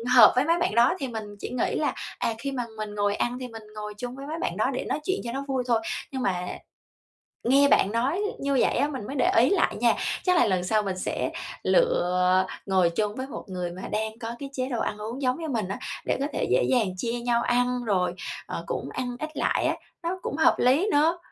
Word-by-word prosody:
hợp 225 -4 +10
với 255 +2 +3
mấy 335 +2 +3
bạn 360 +2 0
đó, 235 +1 +5
thì 270 - -2
mình 225 -3 -4 0.2
chỉ - - -5
nghĩ 250 - -1
là, - - 0 0.3
à, 230 - 0
khi 275 +4 -4
mà 255 -2 -2
mình 215 -1 -5
ngồi 205 0 +1
ăn 240 +3 -1
thì 255 - -5
mình 225 -2 -10
ngồi 210 0 -5
chung 245 +3 -5
với 275 +1 -8
mấy 315 +2 -4
bạn - - -2
đó - - +2
để - - -3
nói - - -1
chuyện 380 +5 0
cho 235 - -4
nó 270 +3 -3
vui 265 -2 0
thôi. 235 -2 +3 0.3
Nhưng 265 -2 -3
mà 180 -5 0 1.0
nghe 275 +4 +5
bạn 200 -7 +4
nói 260 - +1 0.2
như 280 0 0
vậy - - +3
á, 285 - +3
mình 260 -8 -5
mới 275 - -5
để 255 - +3
ý 245 +4 +6
lại 400 - +2
nha, - - +3 0.3
chắc 365 -1 +3
là 350 - +5
lần 185 -4 +1
sau 215 +4 +2
mình 190 -2 -3
sẽ - - -2 0.3
lựa 185 - +3 0.2
ngồi 185 -3 +3
chung 210 +4 -1
với 260 +1 -4
một 270 - -7
người 180 -2 -4
mà 180 +2 -8
đang 220 +1 -2
có 230 0 -5
cái 275 -1 -6
chế 255 -1 -2
độ 240 -3 -2
ăn - - -2
uống 225 +6 -5
giống 255 +1 +1
như 320 - -3
mình 225 -7 -1
á, 200 - -4 0.3
để - - +1
có 280 - 0
thể - - 0
dễ - - +4
dàng 235 -6 +3
chia 230 +5 -2
nhau 235 0 +1
ăn, 245 0 +1
rồi, 180 -4 +1 0.3
ờ, - - -5
cũng - - -3
ăn 245 -1 -3
ít 310 - -3
lại - - +1
á, - - +2 0.3
nó 355 +3 -2
cũng - - -3
hợp 315 - +5
lý 275 - +4
nữa. 315 +4 +3
245 Hz, 250 wpm, -26 LUFS, 210-275 Hz, 1.0 s, hợp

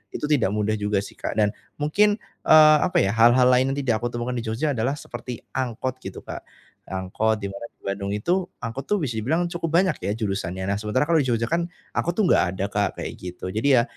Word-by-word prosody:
itu - - -5
tidak 135 -9 +3
mudah 105 0 0
juga 105 -1 0
sih, - - -11
Kak. - - -3
Dan 105 -1 +3 0.2
mungkin, 205 +8 +3 0.3
eee, 155 -1 +8
apa - - -10
ya, 100 - +1
hal-hal 120 +3 +5
lain 130 +2 +3
yang - - -8
tidak 115 -4 +1
aku 120 - -1
temukan 120 +1 -2
di 115 - -6
Jogja 120 +8 0
adalah 130 +2 0
seperti 125 -4 -8
angkot 130 0 -3
gitu, 95 -6 -8
Kak. - - -8 0.4
Angkot 95 +4 0
di 100 - -3
mana 100 +4 -7
di - - -44
Bandung 100 0 -3
itu, 175 - 0 0.2
angkot 115 +4 -5
tuh 210 - +2
bisa 120 -6 -2
dibilang 155 +11 +1
cukup 165 -2 -2
banyak 185 -5 0
ya - - +1
jurusannya. 95 -4 -3
Nah, 100 - 0
sementara 110 +5 0
kalau 165 -1 +4
di 135 - 0
Jogja 115 -2 +1
kan, 170 +1 0 0.2
angkot 170 - -1
tuh 215 - +2
enggak - - +5
ada, 95 - -1
Kak, 100 0 +1
kayak - - -4
gitu. 90 0 -6
Jadi 120 +7 +3
ya, - - 0
120 Hz, 230 wpm, -24 LUFS, 105-145 Hz, 0.4 s, eee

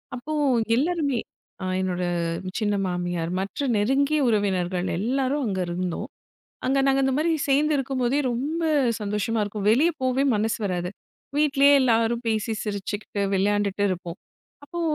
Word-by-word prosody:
அப்போ 250 +5 -5 0.4
எல்லாருமே, 285 -3 0 0.4
அ - - -3 0.2
என்னோட 180 -1 -1 0.6
சின்ன 205 -1 +1
மாமியார், 175 -1 -2
மற்ற 200 +9 -3
நெருங்கிய 280 +8 +2
உறவினர்கள் 190 -4 0
எல்லாரும் 270 +5 0
அங்க 190 -2 -2
இருந்தோம். 175 0 -3 0.6
அங்க 270 +1 +2
நாங்க 270 0 +3
இந்த 265 0 +1
மாரி 330 +2 +2 0.2
சேர்ந்து 300 +3 +3
இருக்கும்போதே 265 0 0
ரொம்ப 290 +8 -2 0.4
சந்தோஷமா 210 +2 -1
இருக்கும். 205 0 -4
வெளிய 285 +9 +4
போவே 260 +1 +1
மனசு 220 +2 0
வராது. 180 -2 -2 0.5
வீட்டிலயே 285 -1 +4
எல்லாரும் 230 -1 +2
பேசி 220 0 0
சிரிச்சுக்கிட்டு 205 0 -4
விளையாண்டுட்டு 200 +1 +1
இருப்போம். 175 -1 -4 0.5
அப்போ 345 +4 -6
225 Hz, 130 wpm, -25 LUFS, 195-275 Hz, 0.6 s, வெளிய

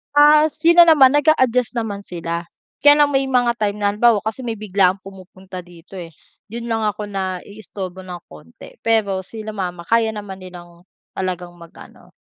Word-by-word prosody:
Ah, 300 +1 +6
sila 335 +3 +5
naman 285 -5 +6
nag-a-adjust 260 -5 +2
naman 220 -4 -3
sila. 170 -3 -6 0.3
Kaya 290 0 +7
lang 290 - +1
may 270 -1 +1
mga 250 -2 +2
time 205 -1 -1
na 205 -1 0
halimbawa 215 0 +2
kasi 225 +3 -5
may 225 - -3
biglaang 195 -3 +1
pumupunta 190 -1 -11
dito 175 +1 -13
eh, 170 - -7 0.4
do'n 230 +3 -7
lang 225 -1 0
ako 210 0 -3
naiistorbo 190 -1 -6
ng 180 -2 -9
konti. 80 +1 -15
Pero 215 -4 +1
sila 220 -1 -7
mama 180 -4 -5
kaya 225 +3 +1
naman 200 -2 -8
nilang 175 -1 -13 0.2
talagang 180 -2 -4
mag-ano. 170 -1 -16
205 Hz, 160 wpm, -19 LUFS, 185-235 Hz, 0.4 s, Kaya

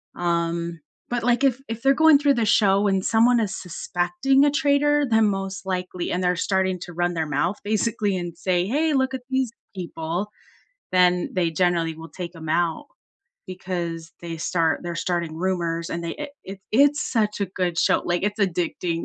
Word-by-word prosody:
um, 170 -1 -1 0.3
but 240 -1 -2
like 245 +2 +2
if 265 -2 +3
if 225 0 -5
they're 270 0 +4
going 315 0 +6
through 285 -1 +3
the 230 -2 +1
show 205 -1 +3
and 195 -1 +1
someone 235 +2 +4
is 210 -4 -1
suspecting 180 - +1
a 290 - +3
traitor, 290 +1 +2
then 220 -1 +4
most 195 -1 -4
likely 180 -1 -3
and 180 +1 -1
they're 180 0 +2
starting 190 0 0
to 180 - -8
run 175 +1 0
their 160 -2 -2
mouth 160 +7 0
basically 210 -2 0
and 175 -1 -5
say, 180 -1 0
"Hey, 300 +8 +1
look 265 -1 +1
at 260 - -4
these 260 -3 0 0.2
people," 175 +2 -4 0.6
then 180 -1 +3
they 175 -3 +1
generally 170 -2 +1
will 165 +1 -10
take 175 -2 -7
them 160 -2 -8
out. 170 - 0 0.6
Because 175 -3 -5
they 170 -1 -6
start 165 0 0
they're 175 - -4
starting 170 -2 -2
rumors 170 -2 -2
and 170 0 -4
they 165 - -3
it 295 -1 -6
it 195 +1 -8
it's 285 +5 +4
such 210 -3 0
a 200 - +1
good 180 -2 -2
show, - - +3
like, 175 0 0
it's 205 +2 -1
addicting. 175 -3 -1
185 Hz, 185 wpm, -23 LUFS, 170-225 Hz, 0.6 s, going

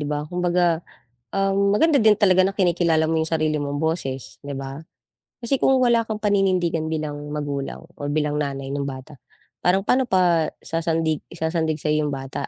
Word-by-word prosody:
'di 150 - -3
ba? 150 0 -1
Kumbaga, 175 -1 +1 0.5
um, 195 0 +1
maganda 305 +1 +4
din 215 -2 +5
talaga 185 -2 +5
na 190 - +1
kinikilala 170 -4 +2
mo 165 - 0
'yong 160 - -2
sarili 155 -1 +1
mong 145 0 -3
boses, 155 -5 -3
'di 140 -1 -5
ba? 135 +2 -6 0.6
Kasi 270 +4 +1
kung 265 -1 +3
wala 235 -2 +3
kang 215 -1 -4
paninindigan 185 -5 +1
bilang 155 -2 -3 0.2
magulang 145 -1 -4 0.2
or 145 - -3
bilang 150 -1 0
nanay 135 -2 -3
nung 140 0 -2
bata, 135 +2 -8 0.5
parang 185 +2 +4
paano 255 +5 +2
pa 175 -5 +3 0.2
sasandig 165 -2 -1
sasandig 160 -2 -1
sa'yo 150 0 +1
'yong 145 - -2
bata, 135 0 -5
160 Hz, 175 wpm, -23 LUFS, 150-190 Hz, 0.6 s, din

